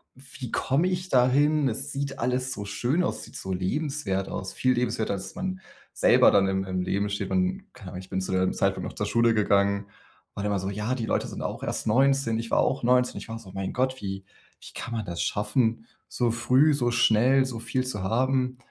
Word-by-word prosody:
„Wie 130 -1 -9
komme 145 +7 +1
ich 185 0 -2
dahin? 140 +3 +3
Es 135 +5 -3
sieht 140 0 -3
alles 125 +1 0
so 105 -5 -5
schön 125 - 0
aus. - - -1
Es - - -7
sieht - - -14
so 95 0 -4
lebenswert 100 - -2
aus.“ 95 - -5
Viel 130 0 +2
lebenswerter, 120 -4 -1
als 95 -1 -6
man 185 0 -4 0.3
selber - - +5
dann 95 -1 +4
im 95 0 0
im 95 -1 -2
Leben 100 +3 -1
steht. 100 - -3
Und 185 +1 0
keine 95 -4 -10
Ahnung, 90 - -6
ich 95 - -14
bin 95 -1 -2
zu 95 - -4
dem 95 0 +1
Zeitpunkt - - 0
noch - - -9
zur 105 - -2
Schule 115 +2 +3
gegangen. 100 -1 +2 0.5
War 100 - -5
dann 105 - 0
immer 100 - 0
so: 95 +1 -3
„Ja, 105 +5 -2
die 120 -3 -3
Leute - - 0
sind - - -7
auch - - -4
erst - - -3
19.“ 130 0 +3
Ich 115 0 -5
war - - +3
auch 130 0 +1
19. 125 +1 +3
Ich - - -8
war 115 - -4
so: 100 -5 -13
„Mein 95 0 -4
Gott, 130 +1 -1
wie 95 -1 -5 0.4
wie - - -12
kann 120 - -5
man 110 -2 -3
das 85 -1 -4
schaffen, 115 +1 0 0.2
so 120 -2 0
früh, 130 +6 +3
so 120 -4 +1
schnell, 120 +3 +4
so 125 -3 -5
viel 130 +2 -2
zu 125 -6 -3
haben.“ 125 +4 0
120 Hz, 230 wpm, -26 LUFS, 100-130 Hz, 0.5 s, selber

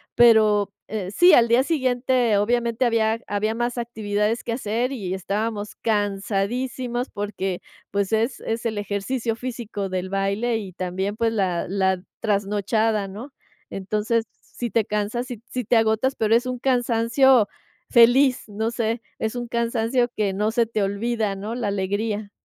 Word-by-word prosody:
pero, 215 -4 +5 0.2
eh, 200 -4 -4
sí, 350 - +6
al 235 -1 +6
día 240 +3 +5
siguiente 255 -6 +1
obviamente 235 +3 +1
había 225 -1 +2
había 215 +2 -1
más 240 +1 -2
actividades 220 -1 -1
que 235 - -1
hacer 235 +2 -1
y 190 -7 -3
estábamos 205 +2 -3
cansadísimos 225 +4 -1
porque, 195 -3 -4 0.3
pues, 200 +1 -1
es 230 +3 +1
es 225 +1 -4
el 220 -2 -1
ejercicio 215 +4 -2
físico 230 -5 -5
del 185 0 -3
baile 200 +5 0
y 195 -3 -7
también, 190 +3 -3
pues, 230 -1 +1
la 185 -5 0
la 190 -1 +1 0.2
trasnochada, 210 0 0
¿no?, 235 +9 -9 0.4
entonces, 210 +4 -1
si 240 - -7
te 225 -1 +1
cansas, 210 +4 -2
si 245 -5 -7
si 250 -2 -3
te 240 - +2
agotas, 225 +4 +2
pero 220 0 +1
es 235 +2 +3
un 255 0 -3
cansancio 245 -1 +3 0.4
feliz, 250 +3 +5
no 220 +2 -2
sé, 230 0 -1 0.2
es 220 +2 -2
un 240 -1 -4
cansancio 235 +1 +1
que 205 -2 0
no 210 +3 0
se 230 +1 +2
te 220 -1 -2
olvida, 210 +1 -1
¿no?, 205 +3 -5
la 235 -3 -2
alegría. 205 +2 -2
220 Hz, 155 wpm, -23 LUFS, 205-240 Hz, 0.4 s, sí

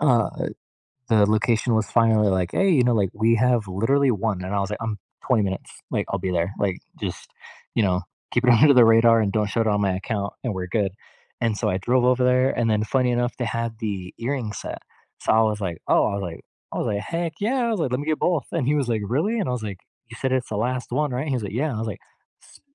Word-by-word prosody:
uh, 125 -7 +3 0.8
the 105 -3 +4
location 115 +1 +2
was 110 -2 0
finally 110 -3 +4
like, 95 -2 0
"Hey," 195 0 +2
you 135 -8 +4
know, 125 - +3
like, 100 -4 +1
"we 115 +2 +3
have 120 -2 +2
literally 130 +9 +2
1." 105 -3 -2
And 95 +2 -4
I 100 - +1
was 100 0 -2
like, 105 - -4
"I'm 110 -2 -3 0.3
20 120 -5 +3
minutes," 95 -1 -5
like, - - -1
"I'll 100 - -2
be 95 0 -2
there," 90 +2 0
like, 95 -3 0 0.2
"just, - - -6 0.4
you 115 - +2
know, 90 -2 +1 0.3
keep 125 - +1
it 125 - +5
under 140 +5 +7
the 120 -2 +8
radar 115 0 +6
and 105 -2 +1
don't 105 -1 +1
show 115 - -1
it 115 - +1
on 105 -1 +2
my 100 -2 +1
account, 100 +1 -3
and 120 -5 -1
we're 90 -1 -4
good." 100 -1 0 0.5
And 115 -3 0
so, - - -1
I 95 - 0
drove 125 +5 +1
over 125 0 +3
there, 130 +1 +3
and 115 -1 +1
then 105 0 +1
funny 125 +2 +1
enough, 120 0 -1
they 125 - -2
had 115 -1 -3
the 95 -4 -4
earring 120 -3 -2
set, - - -6 0.4
so - - +1
I 110 - +5
was 105 -1 0
like, 90 -5 -3
"Oh," - - +4
I - - -1
was 100 - -3
like 85 -3 -7 0.3
I - - -3
was - - -1
like, 100 -1 -1
"heck, 165 +6 -3
yeah!" 240 +3 +1
I - - 0
was 215 -6 -1
like, 130 - 0
"Lemme 135 +3 -1
get 155 0 0
both," 170 -8 +1
and 160 -7 -1
he 145 - +2
was 140 -4 0
like, 110 -3 0
"Really?" 170 - 0
And 200 - -1
I 125 - 0
was 120 -3 -3
like, 100 -4 -5 0.3
"You 115 - -9
said 130 -1 -1
it's 130 -1 0
the 105 - -3
last 125 +3 -2
one, 150 -1 0
right?" 130 +5 -2
He 135 - 0
was 120 - -2
like, 100 -1 -5
"Yeah," 130 +7 0
and 140 -7 -3
I - - -3
was 115 - -3
like, 105 - -6 0.4
s - - -19
115 Hz, 270 wpm, -23 LUFS, 100-125 Hz, 0.8 s, the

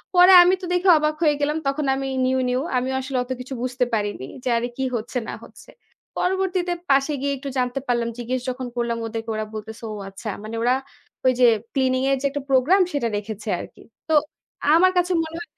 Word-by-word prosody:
পরে 360 +1 +8
আমি 360 +1 +4
তো - - -5
দেখে 360 +1 +2
অবাক 305 0 0
হয়ে 300 -1 +4
গেলাম। 300 +2 +1
তখন 275 +2 0
আমি 270 0 -3 0.2
নিউ, 260 0 +1
নিউ। 250 +1 0 0.2
আমিও 255 +1 -1
আসলে 260 0 -3
অত 250 - -10
কিছু 255 +2 -7
বুঝতে 250 0 0
পারিনি 205 -10 -1 0.2
যে, - - -1
"আরে 235 +1 -1
কি 265 - -1
হচ্ছে 225 +3 -5
না - - -4
হচ্ছে?" - - -16 0.5
পরবর্তীতে 370 -1 0 0.2
পাশে 275 +2 +3
গিয়ে 280 0 0
একটু 275 +1 -6
জানতে 250 +1 0
পারলাম। 235 -1 0
জিজ্ঞেস 245 +1 -3
যখন 255 0 -4
করলাম 235 -1 -1
ওদেরকে, 225 0 -5
ওরা 215 0 -2
বলতেছে 220 +1 -8
"ও - - -5 0.2
আচ্ছা।" 195 +3 -7
মানে 220 +1 -6
ওরা 250 +2 +3 0.5
ওই 255 - +5
যে, 250 - +6 0.3
ক্লিনিং 260 -1 +1
এর 275 - +2
যে, - - -3
একটা 285 +1 -3
প্রোগ্রাম, 270 +9 +4
সেটা 280 -5 0
রেখেছে 210 +1 -7
আরকি। - - -11 0.3
তো - - +2 0.6
আমার 370 +3 +5
কাছে 360 +1 +2
মনে 320 +1 -7
হয় 345 - -11
260 Hz, 210 wpm, -23 LUFS, 240-305 Hz, 0.6 s, পরে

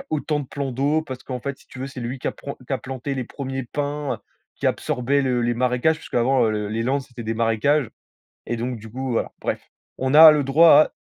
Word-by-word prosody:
a 275 - -29
autant 150 0 -1
de 140 - -7
plans 140 0 -4
d'eau, 145 +5 +1
parce 130 -4 -8
qu'en 125 -2 -5
fait, 140 +1 -5
si - - -22
tu 130 - -12
veux, 135 - -3
c'est 135 -2 -8
lui 120 +3 -4
qui - - -2
a - - -3
pran 140 - -8
qui - - -5
a 135 - +1
planté 135 +1 -5
les 130 - -3
1ers 135 +1 -5
pins, 145 +2 -3
heu, - - -9 0.4
qui - - -2
absorbaient 135 +3 0
le 125 -2 +1
les 120 0 +1
marécages, 125 +6 +2
puisqu'avant, 130 0 +1
heu, - - +1
le 105 -1 -2
les 110 +2 -2
Landes 135 +4 0
c'était 120 -2 -10
des 115 +1 -2
marécages, 115 +4 +1 0.6
et 120 - -2
donc 120 0 -3
du 110 - -11
coup, 130 +1 -4
voilà. - - -1
Bref, - - -2 0.4
on 130 +1 0
a 160 +1 +11
le 150 -2 +2
droit 150 +2 +6
130 Hz, 250 wpm, -23 LUFS, 120-140 Hz, 0.6 s, a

